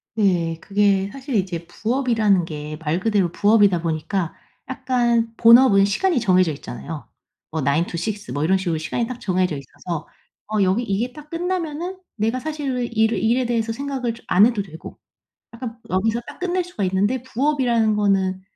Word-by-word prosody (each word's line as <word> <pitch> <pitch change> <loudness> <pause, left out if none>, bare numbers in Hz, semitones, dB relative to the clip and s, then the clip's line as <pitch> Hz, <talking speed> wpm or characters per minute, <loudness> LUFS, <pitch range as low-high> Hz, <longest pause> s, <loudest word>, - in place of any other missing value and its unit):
네. 175 -6 +1
그게 200 -1 +2
사실 270 0 -5
이제 180 -4 -1
부업이라는 225 -2 +1
게 150 -1 -6
말 160 +3 0
그대로 195 -4 +1
부업이다 205 -3 +4
보니까 165 +2 -2 0.4
약간 240 -3 0
본업은 230 -4 +7
시간이 285 - +1
정해져 185 -6 +3
있잖아요. 150 +1 -7 0.4
뭐 160 0 -3
9 140 +5 +2
to - - -6
6 205 +3 -4
뭐 145 - -1
이런 190 +4 +3
식으로 175 -4 -1
시간이 155 +9 -2
딱 250 0 -6
정해져 185 -4 0
있어서 155 +4 -6 0.4
어 215 -1 +1
여기 190 +6 +2
이게 230 +4 -2
딱 300 0 -12
끝나면은 345 0 -3 0.2
내가 225 +4 0
사실 300 -3 -3
왜 250 -1 -1
일을 220 0 +1
일에 240 +3 +2
대해서 230 -1 0
생각을 260 -1 -3
좀 230 - -15
안 195 +4 +6
해도 230 -3 +1
되고 165 -5 -10 0.6
약간 230 0 -7
여기서 220 +5 +1
딱 - - -10
끝낼 365 0 0
수가 345 - -5
있는데 200 +7 +1
부업이라는 250 -5 +1
거는 195 -2 +1
215 Hz, 355 characters per minute, -22 LUFS, 185-250 Hz, 0.6 s, 본업은